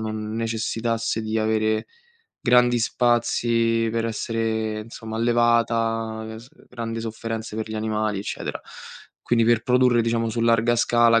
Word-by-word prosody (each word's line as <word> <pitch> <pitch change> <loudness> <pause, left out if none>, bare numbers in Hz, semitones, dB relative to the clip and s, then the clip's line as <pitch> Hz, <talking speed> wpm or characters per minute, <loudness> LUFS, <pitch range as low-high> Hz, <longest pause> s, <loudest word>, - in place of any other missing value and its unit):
non 110 0 -4
necessitasse 115 0 -1
di 110 0 -1
avere 110 0 0 0.5
grandi 125 0 +4
spazi 115 -1 +1
per 115 0 -1
essere 110 -1 -2
insomma 110 0 -8
allevata, 115 -1 +1
e - - -8
s 120 - -14
ehm, - - -21
grandi 115 -2 -5
sofferenze 115 -1 -5
per 110 0 -4
gli - - -4
animali 110 -1 -1
eccetera. 100 - -5 0.6
Quindi 115 -1 +2
per 115 -1 +3
produrre 125 -1 +3
diciamo 115 0 0
su 115 +1 -3
larga 115 +1 +3
scala 120 -1 +4
115 Hz, 140 wpm, -23 LUFS, 110-115 Hz, 0.6 s, grandi